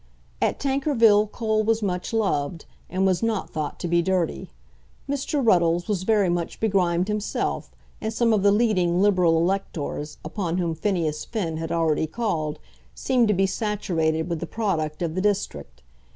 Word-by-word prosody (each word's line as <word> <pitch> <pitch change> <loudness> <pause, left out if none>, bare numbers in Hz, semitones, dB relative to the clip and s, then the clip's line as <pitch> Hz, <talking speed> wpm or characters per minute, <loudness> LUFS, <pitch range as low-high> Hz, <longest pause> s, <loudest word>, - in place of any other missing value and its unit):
At - - +1
Tankerville 260 -7 +3
coal 220 0 0
was 225 0 +1
much 180 -2 -2
loved, 175 -8 -1 0.2
and 185 +2 0
was 185 -2 +2
not 225 -3 -1
thought 155 -2 -4
to - - -2
be 170 0 +3
dirty. 180 -1 -1 0.6
Mr. 285 +1 -1
Ruddles 175 -4 +3
was 205 -4 -1
very 205 0 +2
much 175 -1 -2
begrimed 185 -4 +1
himself, 210 0 -2 0.3
and 220 - -2
some 230 0 +2
of 210 - +2
the 200 +1 +5
leading 195 -6 +2
Liberal 185 -5 +4
electors, 165 -4 -2
upon 170 +1 -2
whom 170 -3 0
Phineas 160 -3 -1
Finn 175 -9 -3
had 165 0 -4
already 160 -2 +1
called, 160 -7 -2 0.4
seemed 250 -3 +2
to 210 - +2
be 195 +1 +3
saturated 175 -6 -1
with 170 -2 -2
the 170 - -5
product 165 -8 -2
of 165 -2 -2
the 185 - -1
district. 75 - -2
185 Hz, 165 wpm, -24 LUFS, 165-215 Hz, 0.6 s, the